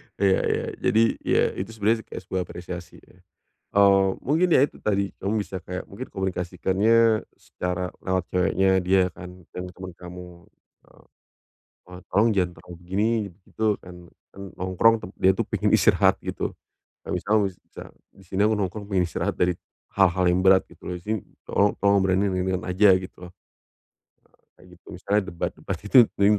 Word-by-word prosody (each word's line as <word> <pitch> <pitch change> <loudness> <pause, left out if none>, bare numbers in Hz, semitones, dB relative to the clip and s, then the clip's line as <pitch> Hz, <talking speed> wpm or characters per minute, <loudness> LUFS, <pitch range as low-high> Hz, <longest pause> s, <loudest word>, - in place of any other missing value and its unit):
Iya 95 -1 +3
iya. - - -1
Jadi, 110 - +3 0.2
ya, - - +3 0.2
itu 105 +4 -5
sebenarnya 110 +2 +1
kayak - - -8
sebuah 90 -1 -3
apresiasi, 90 0 -9
ya. - - -22 0.5
Oh, 100 -1 +5
mungkin 155 +7 +2
ya - - +6
itu 145 - 0
tadi, 100 -2 0
kamu 105 +3 -1
bisa 100 -2 -6
kayak 90 - -7
mungkin - - -7
komunikasikannya 95 +5 +1
secara 90 0 -4
lewat 95 -1 -2
ceweknya 95 +1 +2
dia 95 0 +2
kan, 90 +1 -12 0.2
yang 90 - -4
temen 95 +1 -8
kamu, 90 -1 -11 0.4
eee, - - -22 0.8
"Eee, 90 0 -10
tolong 105 +4 +4
jangan 90 -2 +1
terlalu 90 - -12
begini, 95 +5 0 0.2
begitu. 105 +3 -2
Kan 90 0 -12 0.4
kan 100 - -10 0.2
nongkrong, 95 +5 +3
tem 90 - -9
dia 95 - +4
itu 95 - -1
pengen - - 0
istirahat." - - +4
Gitu. - - -4 0.6
Kayak - - -3
misal 105 - +1
bisa, 90 -2 -12 0.3
"Di 95 - -19
sini 95 +2 -1
aku 110 +1 +3
nongkrong 100 +2 -3
pengen 95 -2 +2
istirahat - - -2
dari 90 0 +2 0.4
hal-hal 95 -2 +3
yang 90 +1 +2
berat, 95 0 +5
gitu - - -10
loh. - - -3
Jadi, 105 +3 -3 0.2
tolong 100 0 +3
tolong 100 -1 +3
obrolannya 95 +1 +2
yang 95 - -1
ringan-ringan 95 0 -2
aja." 95 +3 +5
Gitu. 95 0 -10
Eee, 90 - -10 1.3
kayak - - -17
gitu. - - -37
Misalnya, 100 +3 0
debat-debat 85 - -4
gitu, 105 +6 0 0.2
mending 100 +1 +5
95 Hz, 170 wpm, -24 LUFS, 90-100 Hz, 1.3 s, ya